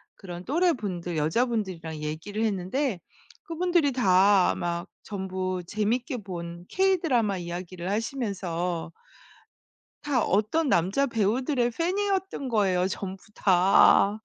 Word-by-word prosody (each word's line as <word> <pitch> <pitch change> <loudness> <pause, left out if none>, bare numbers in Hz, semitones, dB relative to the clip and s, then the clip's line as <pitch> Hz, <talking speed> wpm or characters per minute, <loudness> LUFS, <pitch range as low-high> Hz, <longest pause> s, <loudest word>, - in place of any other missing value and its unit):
그런 175 -3 -8
또래분들 215 - 0
여자분들이랑 180 -2 -1
얘기를 165 +8 -3
했는데 210 +3 -1 0.4
그분들이 340 -3 +1
다 195 -5 +4
막 170 0 -3 0.2
전부 185 -2 -3
재밌게 235 - -1
본 175 -4 -7
K-Drama 330 - +2
이야기를 175 +1 -5
하시면서 185 -8 -2 1.1
다 280 -5 +1
어떤 220 - +1
남자 190 +11 +2
배우들의 240 +3 +1
팬이었던 380 - -1
거예요 190 -5 +2
전부 195 0 -6
다. 195 +2 +4
205 Hz, 265 characters per minute, -26 LUFS, 180-255 Hz, 1.1 s, 다